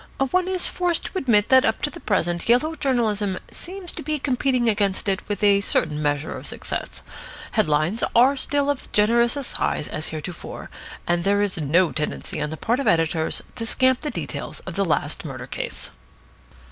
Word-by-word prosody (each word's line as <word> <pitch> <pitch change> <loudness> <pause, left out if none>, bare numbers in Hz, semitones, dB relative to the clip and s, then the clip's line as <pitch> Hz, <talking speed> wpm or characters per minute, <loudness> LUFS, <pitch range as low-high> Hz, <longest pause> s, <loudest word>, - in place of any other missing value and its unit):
One 365 0 +2
is 370 -1 +1
forced 355 -2 +1
to - - -4
admit 230 - +3
that 260 -1 +7
up - - 0
to 295 - 0
the - - -10
present 175 -3 -1
yellow 250 +7 +4
journalism 220 -9 0
seems 365 -1 -4
to - - -7
be 305 +2 -1
competing 255 -2 +1
against 205 -3 +1
it 195 0 +1
with 205 0 -2
a 200 -1 +5
certain 155 -6 0
measure 145 0 -1
of - - -6
success. - - -5 0.5
Headlines 155 +8 +1
are 255 +4 +6
still 285 +1 +1
of 285 - -4
as - - -10
generous 235 +4 +3
a 280 - -3
size 195 - -2
as 155 0 -4
heretofore, 160 +2 -7 0.3
and 175 0 +1
there 200 +2 +3
is 195 -4 -1
no 165 +4 +3
tendency 150 0 -3
on 150 - -1
the 160 - -6
part 235 - 0
of 275 - -1
editors 165 -1 +1
to 230 - -3
scamp 260 +3 +2
the 300 - -3
details - - -5
of - - -7
the - - +1
last - - -1
murder - - -6
case. - - -5
215 Hz, 190 wpm, -23 LUFS, 175-270 Hz, 0.5 s, that